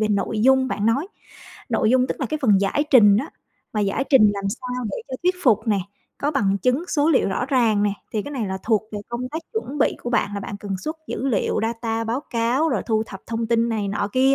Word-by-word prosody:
về 215 Hz, -, +1 dB
nội 210 Hz, +1 st, 0 dB
dung 265 Hz, +1 st, +4 dB
bạn 210 Hz, -2 st, -1 dB
nói. 275 Hz, +10 st, +1 dB, 0.6 s
Nội 220 Hz, -, +2 dB
dung 255 Hz, 0 st, +4 dB
tức -, -, -4 dB
là 265 Hz, -, 0 dB
cái 310 Hz, +5 st, -3 dB
phần 205 Hz, -6 st, +4 dB
giải 200 Hz, +9 st, +1 dB
trình 205 Hz, -6 st, +7 dB
á, 275 Hz, +9 st, -2 dB, 0.4 s
mà 210 Hz, -, -1 dB
giải 205 Hz, +7 st, 0 dB
trình 215 Hz, -7 st, +6 dB
làm 200 Hz, 0 st, -5 dB
sao 250 Hz, +3 st, -4 dB
để -, -, -4 dB
cho 260 Hz, -, -5 dB
thuyết 360 Hz, +1 st, +2 dB
phục 220 Hz, -5 st, +3 dB
nè, 205 Hz, -2 st, +3 dB, 0.4 s
có 290 Hz, -, 0 dB
bằng 200 Hz, -8 st, +1 dB
chứng 255 Hz, +6 st, +1 dB
số 295 Hz, 0 st, +2 dB
liệu 265 Hz, -, +3 dB
rõ 240 Hz, +6 st, -1 dB
ràng 235 Hz, -7 st, +2 dB
nè, 205 Hz, -, +2 dB, 0.2 s
thì 215 Hz, -, -1 dB
cái 285 Hz, -, -7 dB
này 245 Hz, -7 st, -2 dB
là 190 Hz, 0 st, -3 dB
thuộc 220 Hz, -2 st, +2 dB
về 210 Hz, -, -3 dB
công 240 Hz, +1 st, -4 dB
tác 320 Hz, +4 st, -4 dB
chuẩn 295 Hz, -, -4 dB
bị -, -, +2 dB
của 240 Hz, -, -3 dB
bạn. 205 Hz, -4 st, 0 dB
Là 200 Hz, -, -3 dB
bạn 200 Hz, -, -6 dB
cần 195 Hz, -2 st, -3 dB
xuất 310 Hz, -, -5 dB
dữ 265 Hz, -, -3 dB
liệu, 220 Hz, -, 0 dB
data, 225 Hz, 0 st, -2 dB
báo 230 Hz, +4 st, -1 dB
cáo 240 Hz, +7 st, +1 dB
rồi 245 Hz, -10 st, 0 dB
thu 220 Hz, -2 st, +1 dB
thập 195 Hz, -, -9 dB
thông 230 Hz, 0 st, -2 dB
tin 230 Hz, 0 st, +2 dB
này 215 Hz, -3 st, -1 dB
nọ 200 Hz, 0 st, -1 dB
kia, 265 Hz, +1 st, +4 dB
230 Hz, 255 wpm, -22 LUFS, 210-265 Hz, 0.6 s, trình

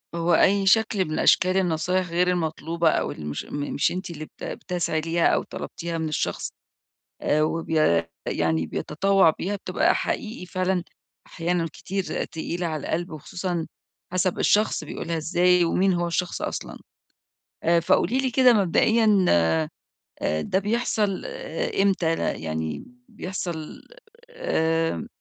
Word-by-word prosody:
هو 170 Hz, +1 st, +1 dB
أي 195 Hz, +3 st, +4 dB
شكْل 210 Hz, -1 st, +3 dB
من 155 Hz, -, -3 dB
أشكال 185 Hz, +1 st, +4 dB
النصايح 180 Hz, +1 st, +1 dB
غير 175 Hz, +2 st, +2 dB
المطلوبة 165 Hz, -1 st, 0 dB
أو -, -, 0 dB
اللي 75 Hz, -, -8 dB
مش 75 Hz, -1 st, -4 dB
م 145 Hz, 0 st, -4 dB
مش -, -, +2 dB
أنتِ 185 Hz, +1 st, -4 dB
اللي 155 Hz, -2 st, -6 dB
بت -, -, -16 dB
بتسعي 170 Hz, -3 st, -2 dB
ليها 165 Hz, +1 st, +2 dB
أو -, -, +2 dB
طلبتيها 170 Hz, 0 st, -5 dB
من 160 Hz, -1 st, -2 dB
الشخص 155 Hz, -, -2 dB, 0.7 s
آآ 150 Hz, -, +2 dB
وبيا 155 Hz, -, +1 dB, 0.2 s
يعني 80 Hz, 0 st, 0 dB
بيتطوّع 195 Hz, -, +2 dB
بيها، 185 Hz, +6 st, -2 dB
بتبقى 195 Hz, -, +1 dB
حقيقي 215 Hz, -4 st, -3 dB
فعلًا 185 Hz, 0 st, -1 dB, 0.4 s
أحيانًا 170 Hz, 0 st, -1 dB
كتير 195 Hz, 0 st, -3 dB
تقيلة 170 Hz, +2 st, -4 dB
على 155 Hz, -2 st, -3 dB
القلْب 175 Hz, +2 st, -2 dB
وخصوصًا 175 Hz, +2 st, -4 dB, 0.4 s
حسَب 185 Hz, 0 st, 0 dB
الشخص 210 Hz, -6 st, +2 dB
بيقولها 165 Hz, +2 st, -4 dB
إزاي 175 Hz, +2 st, +3 dB
ومين 185 Hz, +3 st, +2 dB
هو 175 Hz, 0 st, 0 dB
الشخص 175 Hz, +1 st, -2 dB
أصلًا -, -, -4 dB, 0.9 s
آآ، 170 Hz, +1 st, +4 dB
فقولي 175 Hz, +7 st, +2 dB
لي 265 Hz, -1 st, 0 dB
كده 255 Hz, 0 st, +6 dB
مبدئيًا 210 Hz, +1 st, +3 dB, 1.0 s
آآ 75 Hz, +1 st, 0 dB
ده 185 Hz, -, 0 dB
بيحصَل 210 Hz, -1 st, 0 dB
آآ -, -, -3 dB
إمتى؟ 185 Hz, -4 st, +2 dB
أنا -, -, 0 dB
يعني 80 Hz, -1 st, -4 dB, 0.3 s
بيحصَل 175 Hz, -4 st, -5 dB, 0.5 s
آمم، 165 Hz, -, 0 dB
175 Hz, 140 wpm, -25 LUFS, 160-190 Hz, 1.0 s, كده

